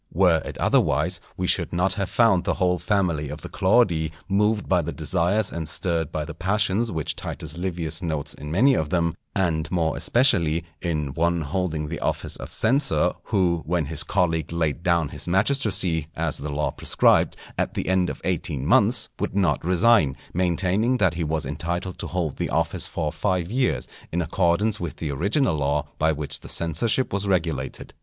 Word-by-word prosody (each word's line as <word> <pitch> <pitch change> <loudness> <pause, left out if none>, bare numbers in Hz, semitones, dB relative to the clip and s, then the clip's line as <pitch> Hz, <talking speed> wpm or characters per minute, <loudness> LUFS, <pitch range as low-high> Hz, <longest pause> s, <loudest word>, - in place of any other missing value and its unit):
Were 85 -2 +3
it - - -7
otherwise 80 +5 +1 0.2
we 90 - -1
should - - +1
not 90 +2 +2
have 100 0 -3
found 115 -7 +3
the - - -1
whole 90 -2 +1
family 85 -8 0
of - - -7
the - - -8
Claudii 95 -6 +2 0.2
moved 105 +2 +1
by 90 -2 +3
the 85 +1 -4
desires 90 +6 0
and 80 -2 -4
stirred 80 0 -1
by 75 -1 -3
the 85 - -7
passions 105 +5 0
which 80 -4 -2
Titus 80 -1 -5
Livius 85 -2 -3
notes 80 -5 -3
in 75 - -9
many 120 - +4
of 80 - -1
them, 85 -2 0 0.2
and 80 -5 0
more 80 -3 0
especially 85 - +3 0.2
in 75 -5 -2
one 85 +2 +1
holding 80 -1 -2
the 80 +2 -5
office - - -2
of - - -8
censor, 135 +1 +2
who, 90 -5 +1
when 85 -2 0
his 75 +1 +2
colleague 80 -5 0
laid 80 -2 -1
down 85 -4 +1
his - - -3
magistracy, 95 - +2
as 80 -1 -1
the 75 - -5
law 75 +1 -1
prescribed, - - +2 0.2
at - - -2
the - - -3
end 95 -1 +2
of - - -7
eighteen 80 -6 -2
months, - - +4
would - - -3
not 100 -3 +1
resign, 90 - +3 0.2
maintaining 95 +7 +1
that 95 -8 +2
he 85 0 -3
was 80 -1 -1
entitled 85 +6 -4
to - - -3
hold 85 -5 -3
the - - -2
office - - +1
for 80 -3 -3
five 90 -1 -1
years 130 +1 0 0.2
in 85 - -1
accordance 90 +5 +1
with 85 - -5
the 75 -3 -4
original 100 - +1
law 75 0 0
by 80 +1 +3
which 75 -1 -5
the - - -12
censorship 95 - +1
was 100 0 0
regulated. 80 -8 -2
85 Hz, 185 wpm, -24 LUFS, 80-95 Hz, 0.2 s, many